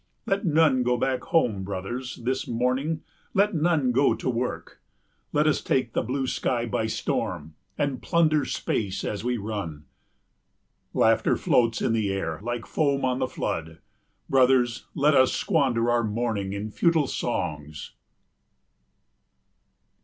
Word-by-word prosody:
Let 195 Hz, -4 st, 0 dB
none 155 Hz, -4 st, +4 dB
go 125 Hz, 0 st, +1 dB
back 130 Hz, +1 st, -1 dB
home, 115 Hz, -, +1 dB
brothers, 100 Hz, +7 st, -5 dB
this 130 Hz, +2 st, -1 dB
morning, 130 Hz, +7 st, -1 dB, 0.3 s
let 200 Hz, +2 st, +3 dB
none 155 Hz, -5 st, +2 dB
go 135 Hz, +3 st, +3 dB
to -, -, -3 dB
work. 125 Hz, +1 st, -4 dB, 0.5 s
Let 150 Hz, +1 st, +2 dB
us 155 Hz, -, +2 dB
take 125 Hz, -3 st, 0 dB
the -, -, +1 dB
blue 130 Hz, +3 st, -2 dB
sky 120 Hz, -2 st, -1 dB
by 110 Hz, -1 st, -1 dB
storm 80 Hz, -7 st, -3 dB, 0.2 s
and 140 Hz, -4 st, -1 dB
plunder 155 Hz, -3 st, +2 dB
space 100 Hz, -6 st, -2 dB
as 105 Hz, 0 st, -3 dB
we 125 Hz, 0 st, 0 dB
run. 100 Hz, -9 st, -5 dB, 1.1 s
Laughter -, -, +3 dB
floats 115 Hz, -2 st, +2 dB
in 115 Hz, -, +2 dB
the 110 Hz, -3 st, 0 dB
air 80 Hz, -5 st, -3 dB
like 120 Hz, +1 st, -4 dB
foam 140 Hz, -3 st, 0 dB
on 130 Hz, 0 st, 0 dB
the -, -, 0 dB
flood. 80 Hz, -1 st, -4 dB, 0.5 s
Brothers, 125 Hz, -2 st, +3 dB
let 150 Hz, +2 st, +3 dB
us 130 Hz, -2 st, +4 dB
squander 120 Hz, -3 st, +1 dB
our 120 Hz, 0 st, +2 dB
morning 110 Hz, -3 st, -2 dB
in 100 Hz, +2 st, -4 dB
futile 165 Hz, +4 st, +2 dB
songs. 75 Hz, -, -4 dB
125 Hz, 140 wpm, -26 LUFS, 110-140 Hz, 1.1 s, none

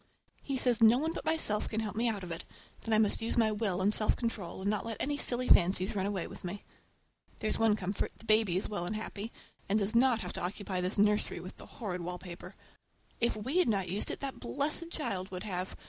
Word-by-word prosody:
He 275 Hz, -2 st, -2 dB
says 245 Hz, -3 st, +3 dB
no 225 Hz, +2 st, +8 dB
one 320 Hz, +4 st, -1 dB
but -, -, -6 dB
myself 315 Hz, -10 st, +1 dB
can 220 Hz, -, -1 dB
help 215 Hz, -2 st, -4 dB
me 235 Hz, +2 st, +2 dB
out 205 Hz, -4 st, -3 dB
of 175 Hz, -, -6 dB
it, 165 Hz, -, -4 dB, 0.4 s
that 225 Hz, -, -4 dB
I -, -, +5 dB
must 215 Hz, 0 st, +3 dB
use 225 Hz, -, -2 dB
my 220 Hz, -2 st, +4 dB
will 205 Hz, -4 st, -1 dB
and 205 Hz, +2 st, +3 dB
self 215 Hz, -, +3 dB
control 230 Hz, -8 st, -3 dB
and 195 Hz, -, -2 dB
not 210 Hz, -1 st, +1 dB
let 225 Hz, -2 st, -4 dB
any 290 Hz, +1 st, 0 dB
silly 255 Hz, -3 st, -1 dB
fancies 185 Hz, +3 st, +4 dB
run 195 Hz, -1 st, 0 dB
away 195 Hz, -4 st, -1 dB
with -, -, -10 dB
me. 185 Hz, +3 st, -5 dB, 0.7 s
There's 215 Hz, -, -1 dB
one 225 Hz, -2 st, +4 dB
comfort, 195 Hz, -1 st, -2 dB
the -, -, -16 dB
baby 215 Hz, -4 st, +3 dB
is 190 Hz, -, 0 dB
well 175 Hz, -5 st, -3 dB
and 215 Hz, -, -2 dB
happy, 215 Hz, 0 st, -5 dB, 0.4 s
and 205 Hz, -, +3 dB
does 205 Hz, +1 st, 0 dB
not 240 Hz, -1 st, +4 dB
have -, -, -5 dB
to -, -, -4 dB
occupy 190 Hz, 0 st, -2 dB
this 185 Hz, +4 st, -1 dB
nursery 210 Hz, +1 st, +2 dB
with -, -, -9 dB
the -, -, -11 dB
horrid 185 Hz, -6 st, -5 dB
wallpaper. 180 Hz, 0 st, -7 dB, 0.6 s
If 235 Hz, 0 st, +2 dB
we 260 Hz, -, 0 dB
had 360 Hz, -, +4 dB
not 195 Hz, -4 st, 0 dB
used 200 Hz, -, +1 dB
it -, -, -5 dB
that 275 Hz, -1 st, -4 dB
blessed 305 Hz, +4 st, -1 dB
child 205 Hz, -, -2 dB
would 180 Hz, -1 st, -5 dB
have! 185 Hz, -3 st, -3 dB
210 Hz, 240 wpm, -32 LUFS, 190-230 Hz, 0.7 s, no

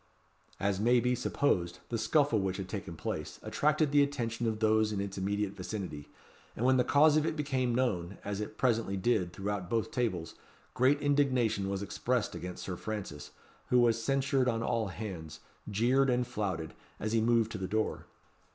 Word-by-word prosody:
As 100 Hz, -1 st, 0 dB
may 120 Hz, +3 st, +4 dB
be 125 Hz, +1 st, +1 dB
supposed, 95 Hz, -8 st, 0 dB
the 115 Hz, -, -1 dB
scuffle 130 Hz, 0 st, +3 dB
which 95 Hz, -1 st, -1 dB
had 95 Hz, -2 st, -5 dB
taken 95 Hz, -4 st, -5 dB
place, 75 Hz, -1 st, -5 dB
attracted 150 Hz, +6 st, +1 dB
the 145 Hz, 0 st, +5 dB
attention 120 Hz, -5 st, -1 dB
of 110 Hz, -1 st, -1 dB
those 110 Hz, 0 st, +3 dB
in 105 Hz, -, -2 dB
its 100 Hz, -1 st, -3 dB
immediate 100 Hz, +1 st, -1 dB
vicinity; 90 Hz, -6 st, -6 dB, 0.5 s
and 120 Hz, -, -1 dB
when 130 Hz, 0 st, +5 dB
the 125 Hz, -, +4 dB
cause 150 Hz, +3 st, +5 dB
of 155 Hz, -, +2 dB
it -, -, -1 dB
became 130 Hz, -5 st, 0 dB
known, 100 Hz, -8 st, -1 dB
as 100 Hz, 0 st, -3 dB
it 105 Hz, 0 st, -6 dB
presently 115 Hz, -6 st, +1 dB
did 95 Hz, -3 st, +1 dB
throughout 95 Hz, -1 st, -4 dB
both 115 Hz, +6 st, 0 dB
tables, 95 Hz, -, -1 dB, 0.4 s
great 130 Hz, +4 st, +3 dB
indignation 130 Hz, -8 st, +2 dB
was 100 Hz, 0 st, -2 dB
expressed 105 Hz, +4 st, -1 dB
against 90 Hz, 0 st, -6 dB
Sir 90 Hz, -2 st, -4 dB
Francis, 95 Hz, -9 st, -5 dB, 0.4 s
who 125 Hz, -, +4 dB
was 115 Hz, -1 st, +3 dB
censured 135 Hz, 0 st, +2 dB
on 115 Hz, -1 st, -1 dB
all 115 Hz, -3 st, 0 dB
hands, 90 Hz, -6 st, -7 dB, 0.3 s
jeered 125 Hz, +6 st, +3 dB
and 125 Hz, 0 st, +2 dB
flouted, 95 Hz, -9 st, -3 dB, 0.3 s
as 110 Hz, +1 st, -2 dB
he 115 Hz, -, +3 dB
moved 115 Hz, -1 st, +2 dB
to 105 Hz, -, -5 dB
the 95 Hz, -, -3 dB
door. 110 Hz, +3 st, -1 dB
110 Hz, 180 wpm, -31 LUFS, 95-125 Hz, 0.5 s, the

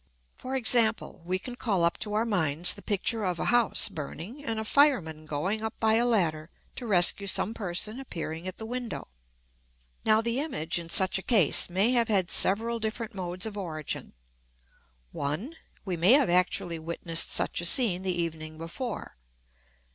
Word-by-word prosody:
For 260 Hz, +1 st, -6 dB
example, 230 Hz, -6 st, +1 dB
we 185 Hz, +1 st, -1 dB
can 245 Hz, +6 st, -8 dB
call 200 Hz, -8 st, -1 dB
up 170 Hz, -, +1 dB
to 210 Hz, -1 st, -2 dB
our 220 Hz, +2 st, +1 dB
minds 180 Hz, -4 st, 0 dB
the -, -, -12 dB
picture 210 Hz, +2 st, -1 dB
of 180 Hz, -3 st, -1 dB
a -, -, -3 dB
house 240 Hz, -2 st, +3 dB
burning 170 Hz, -, -8 dB
and 225 Hz, -5 st, -3 dB
a 220 Hz, -, -4 dB
fireman 190 Hz, -, +2 dB
going 185 Hz, +9 st, -2 dB
up 220 Hz, -, -5 dB
by 220 Hz, -1 st, +3 dB
a 235 Hz, +2 st, +3 dB
ladder 165 Hz, -8 st, 0 dB, 0.3 s
to 245 Hz, -, -5 dB
rescue 200 Hz, 0 st, +3 dB
some 210 Hz, +3 st, 0 dB
person 210 Hz, +3 st, -3 dB
appearing 165 Hz, -8 st, -6 dB
at 185 Hz, -, -6 dB
the 220 Hz, -, -7 dB
window. 245 Hz, -, -6 dB, 0.9 s
Now 215 Hz, 0 st, +4 dB
the 235 Hz, +3 st, -1 dB
image, 175 Hz, -, -2 dB
in 165 Hz, -1 st, -9 dB
such 190 Hz, +2 st, +4 dB
a -, -, -8 dB
case, 195 Hz, -, +4 dB
may 195 Hz, +7 st, +2 dB
have 235 Hz, -2 st, +2 dB
had 190 Hz, -5 st, +1 dB
several 230 Hz, +4 st, +3 dB
different 225 Hz, +1 st, -4 dB
modes 180 Hz, -1 st, -4 dB
of 210 Hz, -2 st, -5 dB
origin. 155 Hz, -5 st, -5 dB, 1.0 s
1. 155 Hz, -, -4 dB, 0.3 s
We 185 Hz, -3 st, -3 dB
may 180 Hz, +8 st, +5 dB
have 275 Hz, -9 st, +4 dB
actually 175 Hz, -2 st, +1 dB
witnessed 165 Hz, 0 st, +1 dB
such -, -, +1 dB
a -, -, -1 dB
scene 185 Hz, -1 st, +5 dB
the 190 Hz, -, -3 dB
evening 155 Hz, -2 st, -4 dB
before. 170 Hz, -, -6 dB
195 Hz, 175 wpm, -27 LUFS, 170-230 Hz, 1.0 s, may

